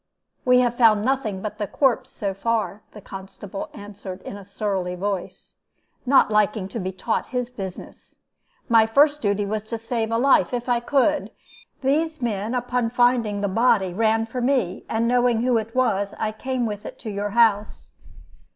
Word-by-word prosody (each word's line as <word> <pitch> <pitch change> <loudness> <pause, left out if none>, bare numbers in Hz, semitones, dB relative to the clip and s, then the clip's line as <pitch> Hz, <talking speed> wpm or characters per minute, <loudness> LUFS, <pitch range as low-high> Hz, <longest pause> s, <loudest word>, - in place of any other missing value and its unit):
"'We 250 0 +5
have 240 -1 0
found 215 -3 +5
nothing 255 -8 -1
but 210 0 -5
the 205 - -2
corpse, 260 0 +1
so 200 -5 -3
far,' 215 0 -1
the 210 - -11
constable 195 +1 -8
answered, 200 -2 -9
in - - -7
a 200 - -9
surly 195 -2 -3
voice, 195 0 -4 0.5
not 265 -4 +5
liking 210 -2 +2
to 230 - -5
be 185 -1 -3
taught 220 +4 -2
his 250 -1 -3
business. 190 -6 -9 0.5
'My 225 -2 +5
first 290 +5 +4
duty 205 -1 0
was 210 +1 -2
to 230 +1 -4
save 225 0 -2
life, 245 +2 +3
if 245 0 -4
I 245 -1 +2
could. 290 +4 +1 0.5
These 310 +4 0
men, 220 -1 -2
upon 245 -1 0
finding 240 -4 +2
the 205 - +1
body, 200 -3 +2
ran 225 +2 +2
for 245 +3 -5
me, 245 -8 0
and 230 +1 0
knowing 245 -1 +2
who 245 -2 +3
it 225 +2 -7
was, 205 -6 +1
I 215 -1 -1
came 255 +3 -2
with 210 -2 -4
it - - -8
to 220 - -6
your 205 +1 -2
house.' 215 -3 +2
225 Hz, 175 wpm, -23 LUFS, 205-245 Hz, 0.5 s, We